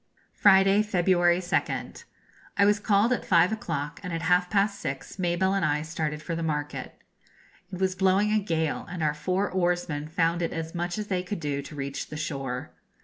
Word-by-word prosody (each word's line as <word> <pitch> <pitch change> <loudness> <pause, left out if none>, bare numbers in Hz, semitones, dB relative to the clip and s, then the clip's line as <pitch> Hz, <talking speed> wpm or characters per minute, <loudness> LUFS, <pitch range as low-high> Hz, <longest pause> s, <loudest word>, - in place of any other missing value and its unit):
Friday, 195 0 +5
February 175 -3 +3
2nd. 180 0 -2 0.5
I 200 - +5
was 205 0 +3
called 210 +3 +3
at - - -2
five 175 +1 +4
o'clock, 165 -8 -3
and 180 -2 -6
at 165 0 -3
half 180 +1 +3
past 200 0 +1
six 135 +7 -5
Mabelle 180 +2 +1
and 195 -2 0
I 150 0 +1
started 155 -2 -3
for 170 - -4
the 165 - -3
market. 150 -2 -3 0.7
It 180 - -6
was 190 -1 +1
blowing 190 +2 +2
a 215 - +3
gale, 160 -6 -2
and 175 -3 -4
our 150 -1 +2
four 185 +6 -1
oarsmen 175 -5 -1
found 165 +1 0
it 165 - -1
as 165 0 -4
much 175 +1 -2
as 210 - -3
they 185 -3 -1
could 185 +2 -5
do 145 -3 -2
to 150 - -10
reach 140 -1 -4
the 150 - -7
shore. 135 -5 -4
175 Hz, 195 wpm, -27 LUFS, 155-190 Hz, 0.7 s, Friday